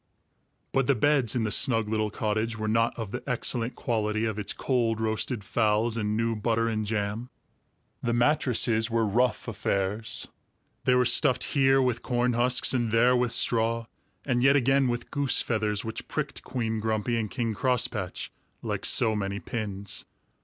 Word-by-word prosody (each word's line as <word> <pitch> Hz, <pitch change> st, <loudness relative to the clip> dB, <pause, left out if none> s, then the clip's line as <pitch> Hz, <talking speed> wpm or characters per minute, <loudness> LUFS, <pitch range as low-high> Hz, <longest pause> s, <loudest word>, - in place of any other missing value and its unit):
But 135 Hz, -2 st, +1 dB
the 140 Hz, -, +3 dB
beds 130 Hz, -1 st, +2 dB
in 120 Hz, -, +1 dB
the 105 Hz, -, -1 dB
snug 115 Hz, -1 st, +2 dB
little 110 Hz, 0 st, 0 dB
cottage 110 Hz, +2 st, -2 dB
were 110 Hz, 0 st, -3 dB
not 115 Hz, +2 st, +1 dB
of 110 Hz, -4 st, -5 dB
the 125 Hz, -, -4 dB
excellent 120 Hz, -1 st, -1 dB
quality 110 Hz, -1 st, -1 dB
of 110 Hz, -1 st, -2 dB
its 105 Hz, -, -2 dB
cold 115 Hz, -4 st, 0 dB
roasted 110 Hz, +1 st, -1 dB
fowls 110 Hz, +1 st, +1 dB
and 105 Hz, -1 st, -1 dB
new 115 Hz, 0 st, 0 dB
butter 115 Hz, +1 st, 0 dB
and 110 Hz, -2 st, -2 dB
jam. 105 Hz, +3 st, -2 dB, 0.7 s
The 120 Hz, -, -1 dB
mattresses 120 Hz, -3 st, +2 dB
were 115 Hz, -1 st, +1 dB
rough 120 Hz, +6 st, 0 dB
affairs. 105 Hz, 0 st, -2 dB, 0.6 s
They 125 Hz, -, +4 dB
were 125 Hz, 0 st, +3 dB
stuffed 130 Hz, +1 st, +3 dB
here 135 Hz, -1 st, +3 dB
with 125 Hz, -2 st, 0 dB
corn 125 Hz, 0 st, 0 dB
husks 125 Hz, +2 st, +3 dB
and 120 Hz, -3 st, 0 dB
there 120 Hz, +3 st, +4 dB
with 125 Hz, -1 st, +1 dB
straw 115 Hz, -1 st, +1 dB, 0.4 s
and 120 Hz, -3 st, +1 dB
yet 135 Hz, +2 st, +5 dB
again 135 Hz, 0 st, +3 dB
with 120 Hz, 0 st, -3 dB
goose 140 Hz, -2 st, +1 dB
feathers, 105 Hz, -2 st, -1 dB
which 110 Hz, -, -5 dB
pricked -, -, -4 dB
Queen 110 Hz, -3 st, -3 dB
Grumpy 110 Hz, +2 st, -1 dB
and 110 Hz, -2 st, -2 dB
King 115 Hz, -2 st, -2 dB
Crosspatch 120 Hz, -5 st, -1 dB, 0.3 s
like -, -, -2 dB
so 110 Hz, -2 st, +3 dB
many 100 Hz, -1 st, -3 dB
pins. 100 Hz, -4 st, -5 dB
115 Hz, 165 wpm, -27 LUFS, 110-125 Hz, 0.7 s, yet